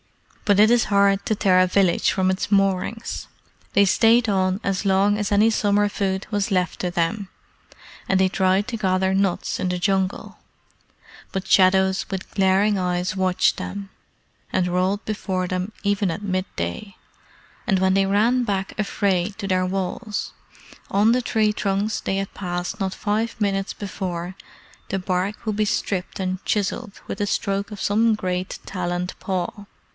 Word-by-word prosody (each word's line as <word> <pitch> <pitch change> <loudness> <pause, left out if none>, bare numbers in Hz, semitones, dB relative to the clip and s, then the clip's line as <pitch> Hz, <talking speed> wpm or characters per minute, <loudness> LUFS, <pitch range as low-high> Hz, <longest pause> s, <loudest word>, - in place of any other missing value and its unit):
But 205 -1 +3
it 215 +1 +7
is 240 -1 +4
hard 200 -1 +3
to 215 - +1
tear 190 -3 +3
a 185 - +4
village 185 -1 +2
from 190 -1 +1
its 190 +2 -3
moorings. 195 +3 0 0.5
They 200 - +5
stayed 225 +4 +4
on 190 -1 +1
as 195 0 0
long 200 +1 +3
as 210 -1 -2
any 210 +2 +5
summer 205 -1 +2
food 195 -1 -2
was 205 0 -1
left 185 -1 0
to 180 - -1
them, 185 +3 -1 0.8
and 190 - +3
they 190 - +4
tried 190 +1 +1
to 235 - -3
gather 190 -2 +1
nuts 195 -2 0
in 185 - 0
the 180 - -1
Jungle, 190 0 -1 0.9
but 190 -1 -4
shadows 190 0 +4
with 190 -2 -6
glaring 195 +1 +3
eyes 180 0 -1
watched 185 -1 +2
them, 200 0 -6 0.6
and 185 -1 +1
rolled 185 +3 0
before 190 -4 -2
them 185 +3 -3
even 205 -2 +1
at 185 - -5
mid 185 -1 -1
day; 85 - -4 0.7
and 195 - +2
when 190 0 +3
they 195 0 +3
ran 225 +6 +3
back 195 -4 -3
afraid 200 -2 0
to 200 -3 -4
their 185 -1 +1
walls, 195 +3 -3 0.6
on 205 +3 +3
the 250 - +2
tree 220 -3 +1
trunks 200 +1 -1
they 195 - -1
had 195 0 -3
passed 180 +1 -4
not 190 -2 -1
five 220 +2 -2
minutes 195 -2 0
before 185 -3 -5 0.5
the 195 - -1
bark 185 +4 -2
would 215 -2 -1
be 215 - +1
stripped 195 -3 -2
and 185 0 -3
chiselled 210 +1 -2
with - - -5
the 205 - 0
stroke 200 0 -1
of 205 - -7
some 220 +3 +2
great 185 -2 -3
taloned 180 -1 -3
paw. 190 +2 -3
195 Hz, 165 wpm, -23 LUFS, 185-205 Hz, 0.9 s, it